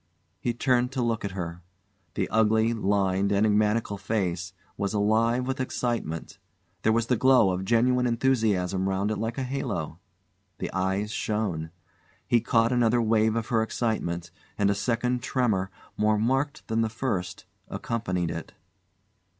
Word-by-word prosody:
He 120 +5 0
turned 125 0 +2
to 130 - -1
look 115 -2 -1
at 100 -2 -3
her. 85 -1 -5 0.5
The - - 0
ugly, 110 +1 +3
lined, 100 -2 +1
enigmatical 105 0 +2
face 90 -4 -2 0.2
was 100 +1 -2
alive 115 +4 +2
with 130 +1 -3
excitement. 120 -10 -3 0.4
There 110 - +3
was 115 +1 +2
the 125 - +2
glow 125 -5 +5
of 90 +1 -3
genuine 125 +3 +3
enthusiasm 105 -7 +1
round 95 +2 0
it 110 - -1
like 115 +3 -3
a 135 - -1
halo. 120 - -3 0.6
The - - -5
eyes 95 +3 -1
shone. 105 -8 -2 0.6
He 120 - +3
caught 115 +1 +2
another 120 -1 +3
wave 110 -1 +2
of 115 -1 -2
her 115 -2 +2
excitement, 90 -7 -2 0.3
and 100 -1 +3
a - - +3
second 120 +4 0
tremor, 110 -7 0 0.3
more 105 0 +3
marked 135 +6 0
than 115 0 +1
the 110 - +1
first, 100 -7 -3 0.2
accompanied 100 -5 -2
it. 85 - -6
110 Hz, 150 wpm, -27 LUFS, 95-120 Hz, 0.6 s, glow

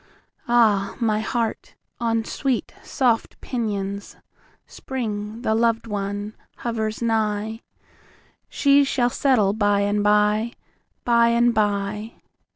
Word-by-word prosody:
Ah, 215 -5 +3
my 220 -3 +1
heart, 230 +1 -3 0.2
on 230 -1 0
sweet 265 -1 -2
soft 240 -4 0
pinions, 200 -5 -4 0.5
Spring, 220 -3 -5
the 220 - +1
lov'd 230 0 +1
one, 205 0 -4 0.2
hovers 220 -1 -3
nigh, 220 0 -1 0.9
She 280 0 +4
shall 250 -3 +1
settle 230 -9 +2
by 205 -1 +2
and 205 0 +1
by, 210 +2 +2 0.5
By 235 -1 +4
and 235 +1 +3
by! 210 +1 -1
220 Hz, 105 wpm, -23 LUFS, 205-235 Hz, 0.9 s, She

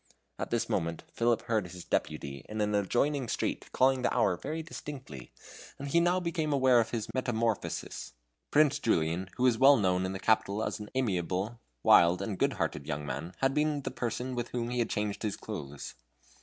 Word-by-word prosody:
At - - -3
this - - 0
moment 85 0 -1
Philip 115 -1 +1
heard 110 -5 0
his 90 0 -9
deputy 70 -3 -2
in 110 - -4
an 105 0 +1
adjoining 125 +7 +1
street - - -2
calling 130 0 +3
the - - +1
hour 115 -7 +2
very 155 - -4
distinctly, 135 - -8 0.5
and 140 +1 -5
he 170 - +4
now 175 +2 +3
became 170 -3 -1
aware 130 -3 +5
of 115 -1 +1
his 115 -3 -4
metamorphosis. 115 - -2 0.4
Prince 150 0 +4
Julian, 90 - 0
who 125 - 0
was 125 -3 +4
well 135 +1 +8
known 95 -2 +1
in 95 - -4
the 95 - -5
capital 110 0 +2
as - - -3
an 105 0 -8
amiable, 100 -1 -1 0.2
wild, 85 +1 +6
and 100 -1 -4
good - - +2
hearted - - -3
young 75 -1 -3
man, 80 +5 -5
had 135 0 +3
been 150 -1 +1
the - - -3
person 125 +2 -3
with 120 -1 -3
whom 120 -1 -3
he 125 - -1
had 115 - +1
changed 105 -1 -2
his 105 -3 -2
clothes. 70 0 -7
115 Hz, 195 wpm, -30 LUFS, 95-135 Hz, 0.5 s, well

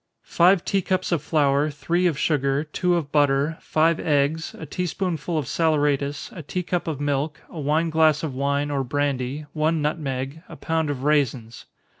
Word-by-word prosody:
_ - - -32
Five 180 +1 +4
tea 195 - +1
cups 185 0 -1
of 170 -4 +1
flour, 145 -1 +2
three 165 +6 0
of 160 -5 -1
sugar, 140 -2 +1
two 175 +3 0
of 155 -4 -2
butter, 145 +1 +2
five 160 +1 +2
eggs, 150 +1 0
a - - -7
tea 180 +5 -3
spoonful 170 -2 -2
of 150 - -1
saleratus, 145 -3 0
a 170 - -6
tea 180 +5 -4
cup 175 0 -2
of 155 -4 -3
milk, 145 +1 -1
a 165 - -7
wine 155 +3 +1
glass 155 -1 +3
of 155 -4 -3
wine, 140 +2 -1
or 140 -1 0
brandy, 140 +1 -2
one 160 +1 +1
nutmeg, 145 -1 -3
a - - -9
pound 160 -2 -1
of 135 -2 -3
raisins. 135 -6 0
150 Hz, 185 wpm, -24 LUFS, 140-160 Hz, -, Five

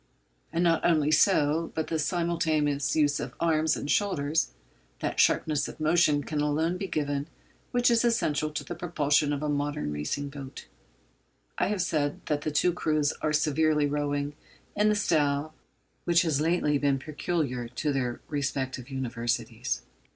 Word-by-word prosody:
And 170 +1 0
not 165 -2 +2
only 155 -3 +3
so, 155 -1 +3
but 160 - -1
by - - -12
the 160 - +1
simultaneous 155 -4 0
use 145 -2 +2
of 125 +1 -6
arms 160 -1 +2
and - - -5
shoulders, 155 - +1 0.5
that - - -3
sharpness 150 -2 +2
of - - -10
motion 155 -2 +3
can 150 0 -2
alone 160 +4 0
be 195 +1 -4
given 145 -3 -2 0.4
which 245 0 +3
is 235 0 +3
essential 155 -10 +1
to 150 - -4
the - - -6
propulsion 150 -4 +1
of 145 0 -2
a - - 0
modern 145 - -1
racing 75 - -3
boat. 140 - -9 0.9
I - - +2
have 205 -3 0
said 145 -4 -1
that 150 -1 -1
the 155 - -2
two 155 +4 +2
crews 155 -3 +1
are 155 - 0
severally 150 0 +2
rowing 145 0 -1 0.4
in 210 +1 +3
the 210 - +3
style 155 -6 +1 0.5
which 170 0 +4
has 155 -4 +1
lately 155 -3 +2
been 140 -1 +2
peculiar 145 -4 -2
to 140 +5 -2
their 125 -3 -2
respective 135 -3 -3
Universities. 120 -3 -2
150 Hz, 160 wpm, -28 LUFS, 145-165 Hz, 0.9 s, which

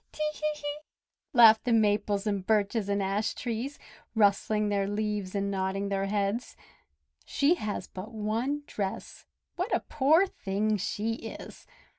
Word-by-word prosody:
"Te 305 - -4
hee!" 300 -1 -3 0.5
laughed 225 -5 +7
the 245 - 0
Maples 205 -2 +2
and 200 -3 -1
Birches 210 -1 +1
and 200 0 +1
Ash 200 +3 -1
trees, 245 +4 -4 0.4
rustling 210 0 +2
their 200 -1 0
leaves 205 -2 -2
and 200 0 0
nodding 195 +1 -1
their 195 0 -1
heads. 205 +3 -1 0.7
"She 290 +4 +2
has 215 -12 -3
but 190 +4 -8
one 230 +7 -2
dress! 195 -7 -5 0.3
What 365 +6 -2
a - - +1
poor 305 +6 +4
thing 210 - -1
she 210 +3 -2 0.2
is!" - - -12
210 Hz, 140 wpm, -29 LUFS, 200-240 Hz, 0.7 s, laughed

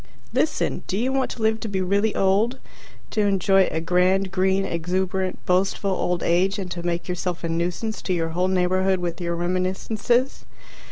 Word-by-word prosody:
Listen. - - 0
Do 190 - -2
you 255 +5 0
want 270 -1 +1
to 230 - -5
live 220 0 +2
to 225 - -5
be 195 -2 -2
really 200 +3 +1
old, 205 +6 +2 0.5
to 215 - +1
enjoy 195 -1 +3
a 160 - -2
grand, 185 +3 +2
green, 190 +1 +1
exuberant, 185 +2 -1
boastful 195 +2 +1
old 180 -2 -1
age 185 +4 +2
and 185 -3 -5
to 175 - -4
make 170 0 -2
yourself 180 -1 -3
a 165 - -2
nuisance 175 +6 -2
to 185 - -1
your 165 -2 0
whole 180 +3 0
neighbourhood 185 +1 +2
with 175 -1 -4
your 170 0 -1
reminiscences? 190 +8 0
185 Hz, 175 wpm, -23 LUFS, 180-195 Hz, 0.5 s, enjoy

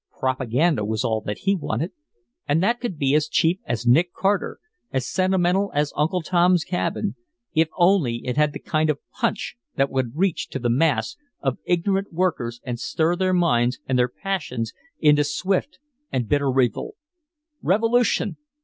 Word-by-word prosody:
"Propaganda" 130 +2 +1
was 110 +2 -1
all 110 -3 0
that 105 - -2
he 195 - +2
wanted, 155 -1 -2 0.6
and 155 +4 +2
that 235 +4 +2
could 235 -10 -3
be 140 -1 +1
as 150 0 +3
cheap 165 +4 +2
as 120 0 -3
Nick 165 +9 +3
Carter, 200 +1 0 0.3
as 130 -2 -1
sentimental 185 +1 +1
as 145 0 +1
Uncle 165 +4 0
Tom's 175 0 +3
Cabin, 110 - -2 0.4
if 160 0 +3
only 175 -9 +3
it 125 - -2
had 150 0 +3
the - - -6
kind 155 0 0
of 150 - +1
"punch" - - -2 0.2
that 135 0 +1
would 130 -2 -1
reach 185 +1 0
to - - -4
the 120 -2 0
mass 130 -4 +1 0.2
of 135 -3 -1
ignorant 195 +3 0
workers 160 -10 -1
and 120 -3 -4
stir 160 +6 0
their 185 +1 +1
minds 125 -9 +2
and 130 -1 +1
their 125 0 +3
passions 125 - -3 0.3
into 150 -1 +5
swift 185 - -1 0.3
and 125 -4 -1
bitter 140 +1 +2
revolt. 130 - 0 0.7
Revolution! 230 +5 +2
155 Hz, 165 wpm, -23 LUFS, 125-185 Hz, 0.7 s, into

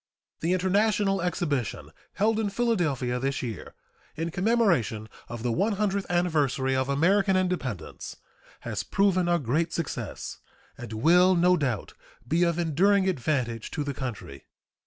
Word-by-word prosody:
The 170 +3 0
international 195 +1 +2
exhibition 160 - -2 0.2
held 220 +3 +1
in 215 -2 0
Philadelphia 170 - 0
this 135 +1 -2
year, 115 -3 -6 0.4
in 165 +2 -3
commemoration 180 - +1 0.2
of 120 -1 -6
the 120 - 0
one 200 - +1
hundredth 200 -1 -1
anniversary 150 -7 +1
of 130 +1 0
American 190 +7 +3
independence, 180 - -3 0.5
has 110 -4 -3
proven 185 - +1
a 175 - +3
great 160 +4 0
success, 165 -3 -5 0.4
and 120 -2 -9
will, 175 +11 +4
no 180 +1 +4
doubt, 130 - -2 0.3
be 165 +3 +1
of 170 -1 +2
enduring 190 +4 +2
advantage 130 - -1
to 150 - -3
the 145 -1 -3
country. 115 - -7
170 Hz, 135 wpm, -27 LUFS, 130-190 Hz, 0.5 s, will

